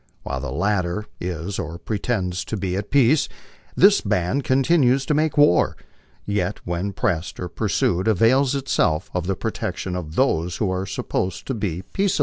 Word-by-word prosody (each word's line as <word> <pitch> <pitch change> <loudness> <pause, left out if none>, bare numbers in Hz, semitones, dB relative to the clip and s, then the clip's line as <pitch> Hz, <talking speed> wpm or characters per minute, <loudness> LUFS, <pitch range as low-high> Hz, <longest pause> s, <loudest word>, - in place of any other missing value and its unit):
While 65 0 -3
tho 70 -2 -4
latter 95 +4 0
is 90 +2 -4
or 85 -2 -4
pretends 95 -2 -2
to 110 - -3
be 95 -2 -2
at 100 +1 -3
peace, 140 +2 +4 0.5
this 200 +2 +6
band 105 +6 0
continues 135 -1 +3
to 150 - +1
make 155 0 +1
war, 145 -12 +4 0.5
yet 105 0 -1
when 90 +3 -2
pressed 90 -2 -2
or 90 - -3
pursued 95 -1 0
avails 125 +6 +3
itself 95 - 0
of 90 -1 -2
the 95 - 0
protection 90 +1 -3
ot 80 -4 -5
those 90 -10 +1
who 100 -4 0
are 95 +1 -2
supposed 95 -1 -3
to 135 - -2
be 95 -6 -3
peaceable. 195 - 0
100 Hz, 165 wpm, -22 LUFS, 90-130 Hz, 0.5 s, this